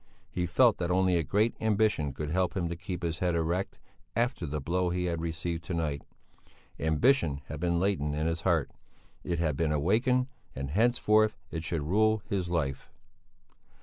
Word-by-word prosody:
He 90 -1 -1
felt 120 +4 +4
that 85 -1 -1
only 90 0 +3
a 85 - +3
great 105 +9 +2
ambition 105 -9 +2
could 75 +2 -5
help 95 +3 0
him 85 -2 0
to 85 - -3
keep 90 +1 -6
his 80 -2 -2
head 90 -2 +1
erect 85 +4 -1 0.4
after 120 - 0
the 75 +1 -3
blow 90 +5 0
he 90 +1 -1
had 85 -2 -1
received 85 0 -3
to 90 - -3
night. 75 -4 -1 0.8
Ambition 80 - +2
had 75 - -5
been 85 0 +1
latent 85 -6 0
in 75 +1 -1
his 80 +1 -1
heart; 85 -7 +1 0.5
it 85 - -2
had 80 -4 0
been 80 +1 0
awakened 110 - +2 0.3
and 70 +1 -4
henceforth 110 +1 +3
it 80 -1 -4
should 80 -2 -2
rule 110 +6 +2
his 95 -3 -2
life. 70 -6 -2
85 Hz, 180 wpm, -29 LUFS, 80-100 Hz, 0.8 s, felt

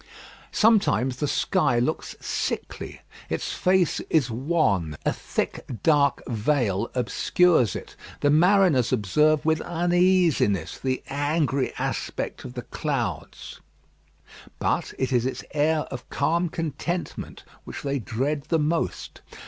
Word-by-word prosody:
Sometimes 135 - +3
the 150 - -1
sky 145 -4 +1
looks 120 +1 -1
sickly. - - -4 0.3
Its - - -2
face 185 -2 +2
is 140 -7 +2
wan. 110 - 0
A - - +2
thick - - -3 0.2
dark 145 -3 +3
veil 115 -3 0
obscures 125 - +2
it. - - -8 0.3
The 145 - +3
mariners 175 - +4
observe 150 - +2
with 160 0 +2
uneasiness 175 - +2
the 130 -1 -2
angry 145 -1 0
aspect - - -3
of 125 - -9
the 125 - -5
clouds. 125 - -4 1.0
But - - -1
it 130 0 -1
is 120 0 +2
its 130 - -5
air 155 +1 +2
of 125 - -7
calm 170 +5 +1
contentment 165 +2 -4 0.2
which - - -8
they 140 -1 -1
dread 135 +5 -2
the 165 - +3
most. 160 +2 -2
145 Hz, 120 wpm, -25 LUFS, 125-165 Hz, 1.0 s, mariners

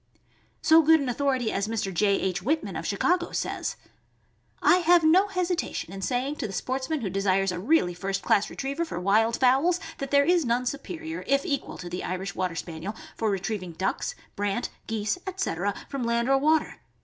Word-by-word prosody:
So 320 +1 +7
good 320 +1 +5
an 275 -3 -2
authority 255 -2 0
as 200 +1 -1
Mr. 215 -4 -2
J. 200 +3 +3
H. 190 0 -1
Whitman, 310 - -1
of - - -4
Chicago, 350 -1 +1
says: - - -2 0.8
I - - +5
have 350 -1 +4
no 360 +6 +5
hesitation 360 - -2
in 195 - -7
saying 255 +8 -1
to 225 - -3
the 195 - -8
sportsman 260 - -2
who 205 - -2
desires 195 0 +1
a 180 - -4
really 205 - +2
first 195 +2 -3
class 200 - +2
retriever 280 +5 -3
for 320 - -5
wild 220 +5 +2
fowls, 275 +8 +3 0.2
there 280 +1 +3
is 350 +1 +3
none 245 0 0
superior, 320 +5 -5
if 275 0 +2
equal, 280 -2 -2
to 175 - -7
the 175 +1 -4
Irish 190 +2 -3
Water 185 -2 -2
Spaniel 170 +5 -5 0.2
for 220 - 0
retrieving 195 -2 -3
ducks, 190 +4 -2 0.2
brant, 205 +3 -1 0.2
geese, 220 +8 -1
etc., 205 - -2
from 275 -2 -4
land 235 +1 +1
or 270 0 +4
water. 310 +2 +2
245 Hz, 185 wpm, -26 LUFS, 195-310 Hz, 0.8 s, So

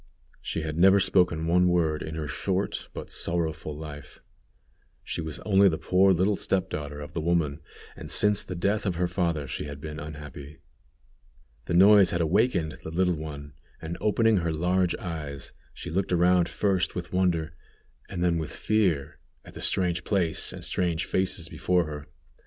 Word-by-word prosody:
she 80 - -3
had 80 +1 -4
never 95 +2 +6
spoken 90 -4 +2
one 90 +2 +3
word 80 -3 +1
in 80 - -5
her 80 -2 -4
short 95 +7 -2
but - - -8
sorrowful 80 -3 -2
life. 75 -3 -9 0.8
She - - -4
was 80 -2 -6
only 100 -1 +4
the 80 - -2
poor 95 +4 +3
little 95 +3 +2
step 95 -1 -1
daughter 75 -1 -5
of 75 - -9
the 80 - -2
woman, 80 -3 0 0.4
and - - -9
since 105 -1 +4
the 90 - -6
death 100 +4 0
of 90 - -1
her 90 +1 0
father 85 -4 -1
she 65 - -5
had 70 -1 -7
been 75 +1 -7
unhappy. 75 -1 -9 1.1
The 85 - -1
noise 100 0 +7
had 85 - 0
awakened 85 -1 +1
the - - -7
little 90 +2 +1
one, 75 -2 -8 0.3
and 80 +1 -5
opening 110 0 +3
her 85 -2 0
large 90 +3 +1
eyes, 75 -6 -6 0.2
she 85 - -8
looked 95 +3 -1
around 90 0 +3
first 95 -4 0
with 90 0 -6
wonder, 85 -4 +1 0.6
and 85 - -3
then 85 -2 +2
with 80 - -4
fear, 95 -10 0 0.3
at - - -13
the - - -9
strange 90 -2 +1
place 90 -6 0
and - - -7
strange 85 -2 0
faces 95 -3 0
before 90 0 0
her. 75 -1 -7
85 Hz, 175 wpm, -27 LUFS, 80-95 Hz, 1.1 s, noise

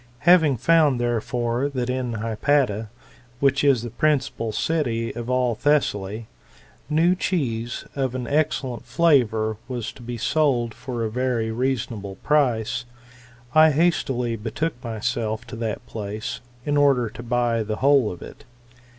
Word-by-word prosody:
Having 160 -6 +6
found, 155 -2 +3
therefore, 120 +2 -1
that 125 -3 -3
in 125 -2 -2
Hypata, 115 0 0 0.5
which 140 0 +2
is 135 -5 +3
the 120 - -5
principal 135 -4 0
city 115 -4 -1
of 120 0 -5
all 125 -1 +2
Thessaly, 110 -6 0 0.6
new 165 +4 +3
cheese 120 -11 -2
of 130 -2 -1
an 125 -1 -3
excellent 135 -3 -1
flavour 120 -6 +2
was 125 -4 -4
to - - -15
be 120 0 -5
sold 120 -2 +1
for 120 0 -5
a 110 - -2
very 120 -2 -1
reasonable 115 -5 -2
price, 125 -5 +1 0.7
I 155 0 +7
hastily 135 -7 +1
betook 115 +9 -2
myself 110 -1 -2
to 130 - -8
that 115 0 -4
place, 105 -1 -5 0.2
in 145 0 +1
order 135 -4 +4
to 110 - -9
buy 120 -1 0
the 110 0 -2
whole 135 -2 +3
of 90 - -9
it. - - -12
120 Hz, 140 wpm, -23 LUFS, 115-140 Hz, 0.7 s, I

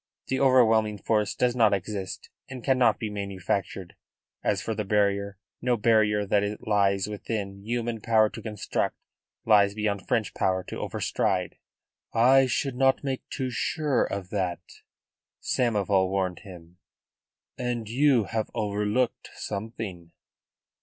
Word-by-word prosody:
The 130 - 0
overwhelming 115 -5 +4
force 105 +1 0
does 125 -1 +1
not 110 -4 +4
exist 95 0 -6 0.2
and 130 -3 -8
cannot 130 -3 +3
be 110 -2 -4
manufactured; 100 -2 -3 0.5
as 100 -2 +1
for 110 - -3
the 105 - -2
barrier, 100 -1 +1 0.2
no 125 -1 +1
barrier 105 -2 +3
that 100 +1 +2
it 105 +1 -4
lies 100 -2 +2
within 100 -1 -5
human 115 0 -2
power 110 -1 +4
to - - -9
construct 105 -3 -2 0.5
lies 100 -2 +5
beyond 105 -3 -2
French 110 -3 0
power 95 -1 0
to - - -7
over - - -4
stride." 90 -2 -1 0.6
"I 130 +3 +6
should 130 +1 -1
not 135 +1 +3
make 135 -2 -4
too 130 -3 -3
sure 145 +2 0
of 100 -2 -4
that," 90 -4 -1 0.8
Samoval 100 -6 +1
warned 95 -2 -1
him. 90 -3 -13 0.8
"And 120 -3 -2
you 130 0 +3
have 110 +2 -3
overlooked 105 +3 -1
something." 100 -5 -6
105 Hz, 135 wpm, -27 LUFS, 100-120 Hz, 0.8 s, I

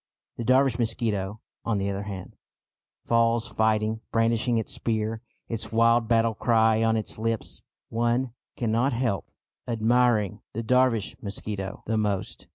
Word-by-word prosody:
The 120 - -3
Dervish 130 0 +3
mosquito, 110 -3 -1 0.2
on 115 -3 0
the 100 0 -1
other 100 0 -3
hand, 100 -2 -7 0.7
falls 115 0 +2
fighting, 110 0 +1
brandishing 115 +1 +2
its 110 - -2
spear, 110 -1 -2 0.3
its 115 -1 -4
wild 115 +1 +4
battle 115 0 +3
cry 110 -1 +3
on 115 0 +3
its 110 - -3
lips. 115 0 -2 0.3
One 120 +2 0 0.2
cannot 120 +3 +1
help 115 -5 -1 0.4
admiring 115 -3 +2
the 115 - -3
Dervish 125 -2 +2
mosquito 100 -1 -5
the 110 0 0
most. 100 -3 -2
115 Hz, 135 wpm, -26 LUFS, 110-115 Hz, 0.7 s, wild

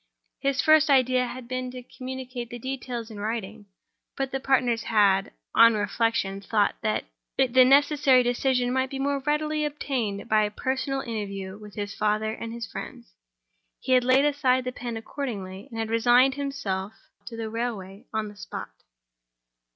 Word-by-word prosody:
His 275 0 0
first 310 -1 +5
idea 255 -2 +4
had 250 -1 -8
been 255 0 -3
to 250 0 -8
communicate 255 -1 -7
the 240 - -6
details 245 -2 -5
in 210 - -8
writing; 215 -1 -4 0.5
but 270 -1 -2
the 270 - -2
partners 255 -4 +2
had, 200 -2 +3 0.2
on 230 0 +7
reflection, 205 -2 0
thought 205 0 +1
that 215 -1 -1 0.3
the 260 -1 +5
necessary 280 -1 +5
decision 245 0 +1
might 260 0 +1
be 270 - -5
more 280 +1 0
readily 300 +2 0
obtained 260 -9 -2
by 215 0 +4
a 210 - +1
personal 265 +5 -2
interview 200 -5 -5
with 210 -1 -12
his 205 0 -4
father 215 +1 0
and 230 0 -6
his 235 0 -5
friends. - - -9 0.7
He - - -4
had 255 -1 +5
laid 260 +3 +4
aside 265 -3 +2
the 255 - -3
pen 240 -2 -5
accordingly, 215 -5 -6
and 230 - -8
had 225 0 -2
resigned 245 +3 +5
himself 220 -9 -3 0.3
to 230 - -7
the 220 -1 -4
railway 220 -2 -4
on 220 -1 -2
the 205 - -11
spot. 205 - -7
245 Hz, 165 wpm, -26 LUFS, 215-265 Hz, 0.7 s, on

